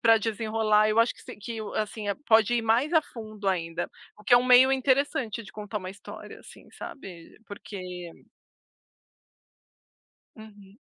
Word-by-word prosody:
pra 225 -1 +6
desenrolar. 215 -1 +1
Eu 215 +1 +1
acho 230 +1 +4
que - - -18
se - - -10
que, 225 +2 -7 0.2
assim, 215 0 -3 0.2
pode 220 +1 +4
ir 235 - +1
mais 230 +6 +2
a 320 - +5
fundo 215 -6 -9
ainda, 165 -3 -2 0.3
o 210 - -18
que - - 0
é - - +10
um 245 - +3
meio 255 +1 +7
interessante 260 -3 0
de 200 - -14
contar 210 0 -6
uma 185 -2 -4
história, 195 - -11
assim, - - -16
sabe, 180 - -10
porque 180 -4 -8 2.3
Uhum. 205 -2 -15
215 Hz, 155 wpm, -27 LUFS, 205-235 Hz, 2.3 s, é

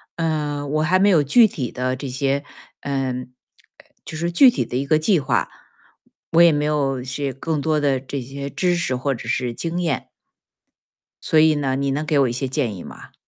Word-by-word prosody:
嗯， 150 -3 -2
我 155 +1 +1
还 170 +4 +3
没 195 +2 +3
有 175 -6 +5
具 220 - +5
体 135 - -5
的 130 0 -2
这 135 +1 -6
些 135 +2 -1 0.4
嗯， 135 -3 -2 0.6
呃， - - -20 0.2
就 160 - -7
是 170 +2 -2
具 255 +10 +7
体 245 - -1
的 - - -7
一 130 - 0
个 155 - +4
计 165 +3 +2
划， 130 -4 0 0.8
我 165 - +5
也 170 -1 +7
没 150 -1 0
有 140 -4 0
是 135 +2 -3
更 150 +3 -3
多 155 0 +1
的 140 -3 +1
这 135 +2 -6
些 140 +2 -6
知 180 +4 0
识 150 -7 -1
或 135 +2 -1
者 115 -2 -8
是 125 -1 -1
经 170 +7 -3
验。 160 -6 -2 1.2
所 155 - +3
以 155 0 +5
呢， 135 -2 -1
你 140 0 -1
能 150 +3 -2
给 150 -1 +1
我 135 - +4
一 120 - -3
些 130 +2 -3
建 125 -6 -1
议 90 - -9
吗？ - - -12
145 Hz, 225 characters per minute, -21 LUFS, 130-155 Hz, 1.2 s, 具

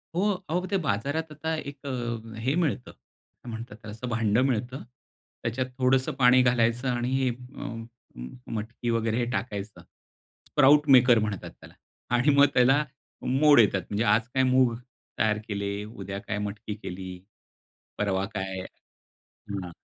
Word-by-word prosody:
हो, 205 +3 +2 0.2
अहो 180 +3 0
ते 195 - +3
बाजारात 140 +9 -1
आता 160 +2 -3 0.2
एक 140 0 -14
अ, 120 -3 -4
हे 135 +3 +1
मिळतं 155 -7 -1
असं - - -24 0.5
काय 120 - -8
म्हणतात 110 -1 -7
त्याला 110 -1 -10
असं 115 +4 -6
भांडं 115 0 +2
मिळतं, 125 +1 -2 0.6
त्याच्यात 125 +3 -1
थोडंसं 130 0 +2
पाणी 125 +1 +7
घालायचं 125 0 +2
आणि 125 +2 0
अ, - - 0 0.3
म 115 0 -6 0.3
म 115 - -9
मटकी 115 +2 -4
वगैरे 115 +1 +1
टाकायचं. 105 -5 -4 0.7
स्प्राउट 145 +2 +5
मेकर 120 -2 +6
म्हणतात 105 -3 -3
त्याला - - -15 0.4
आणि 125 +5 +3
मग 140 0 +7
त्याला 135 +4 +4 0.4
मोड 145 +1 +5
येतात. 100 -3 +4
म्हणजे 105 +2 0
आज 115 +2 +1
काय 130 0 +3
मूग 130 -2 +4 0.5
तयार 110 -1 +2
केले, 100 0 -3
उद्या 100 -2 -7
काय 105 +1 -4
मटकी 105 +1 -6
केली, 95 -3 -7 0.9
परवा 95 -2 0
काय 95 -1 -3 0.9
हं. 95 -3 -4
120 Hz, 150 wpm, -27 LUFS, 105-130 Hz, 0.9 s, पाणी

